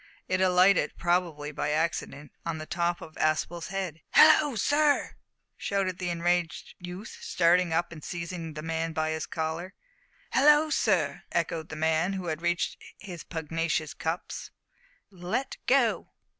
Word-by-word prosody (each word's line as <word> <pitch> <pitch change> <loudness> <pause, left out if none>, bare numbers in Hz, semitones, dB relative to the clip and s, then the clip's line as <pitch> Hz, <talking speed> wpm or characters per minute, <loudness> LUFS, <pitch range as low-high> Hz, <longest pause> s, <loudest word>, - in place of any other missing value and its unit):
It 185 0 0
alighted, 185 +1 +4
probably 170 -4 0
by 145 - -2
accident, 150 -2 -2
on 165 -1 -3
the 155 - -6
top 175 +1 -1
of 160 - -10
Aspel's 160 +2 0
head. 185 -5 -4
"Hallo, 295 -5 +7
sir!" 290 +6 +2 0.4
shouted 190 -3 -1
the 180 -1 -2
enraged 170 -1 -1
youth, 180 +4 -8
starting 175 0 +3
up 170 +2 0
and 155 -3 -10
seizing 170 -2 -5
the 155 - -6
man 165 0 -2
by 155 0 0
his 160 0 -3
collar. 165 +3 -4 0.6
"Hallo, 300 +3 +5
sir!" - - +1
echoed 160 -1 -1
the - - -6
man, 160 +4 +1
who 190 -2 -4
had 160 -1 -3
reached 175 0 -1 0.2
his 180 -6 -8
pugnacious 160 -1 -2
cups, 160 +2 -4 0.6
"let 185 +8 -3
go." 250 -3 +3
170 Hz, 145 wpm, -28 LUFS, 160-185 Hz, 0.6 s, Hallo